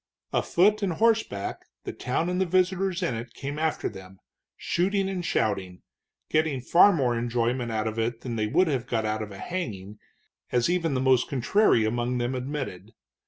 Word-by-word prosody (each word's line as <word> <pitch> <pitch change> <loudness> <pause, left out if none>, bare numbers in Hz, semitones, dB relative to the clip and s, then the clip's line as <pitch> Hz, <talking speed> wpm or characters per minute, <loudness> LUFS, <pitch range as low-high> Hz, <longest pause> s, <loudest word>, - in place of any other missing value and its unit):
Afoot 210 +5 +3
and 195 -4 0
horseback 220 - 0 0.2
the - - -5
town 130 +7 -2
and 180 +1 0
the - - +3
visitors 185 +1 +1
in 170 - 0
it 115 +1 -7
came 145 +2 -5
after 160 -1 0
them, 95 0 -10 0.4
shooting 195 +2 0
and 190 -2 -3
shouting, 95 - -1 0.4
getting 155 -3 +1
far 170 +10 +6
more 130 -9 +1
enjoyment 120 +1 -1
out 110 0 -1
of 110 0 -3
it 115 +1 -2
than 120 -2 -4
they 110 -1 0
would 180 +12 +3
have 130 -5 -1
got 115 -3 -1
out 110 0 -1
of 105 -1 -6
a 100 - -9
hanging, 105 - -5 0.5
as 125 +6 +2
even 165 -5 0
the 130 - 0
most 130 -2 +3
contrary 135 - +3
among 120 +3 -1
them 120 +1 -1
admitted. 125 -7 -5
125 Hz, 180 wpm, -26 LUFS, 115-175 Hz, 0.5 s, far